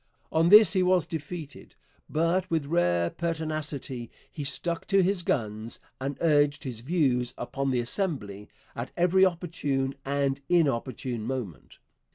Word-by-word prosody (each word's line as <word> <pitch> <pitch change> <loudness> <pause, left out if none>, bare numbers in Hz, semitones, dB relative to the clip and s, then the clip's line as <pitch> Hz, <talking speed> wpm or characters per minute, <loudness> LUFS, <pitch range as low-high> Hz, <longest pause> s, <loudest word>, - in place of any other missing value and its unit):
On 165 +1 +3
this 210 0 +8
he 190 - +3
was 180 -1 +3
defeated, 160 -1 -7 0.3
but 170 +4 +1
with 160 -3 0
rare 90 - +1
pertinacity 155 -6 -3 0.2
he 150 - -5
stuck 165 +5 -2
to 195 -1 +4
his 190 0 +1
guns, 110 -7 -2 0.2
and 135 +1 -3
urged 145 -3 +3
his 125 -5 -5
views 130 -3 0
upon 135 0 -3
the 125 -2 +1
Assembly 120 - -3 0.3
at 120 +2 -4
every 180 +2 +4
opportune 160 -7 0
and 140 0 -1
inopportune 130 -7 0
moment. 115 -6 -5
145 Hz, 135 wpm, -27 LUFS, 130-170 Hz, 0.3 s, this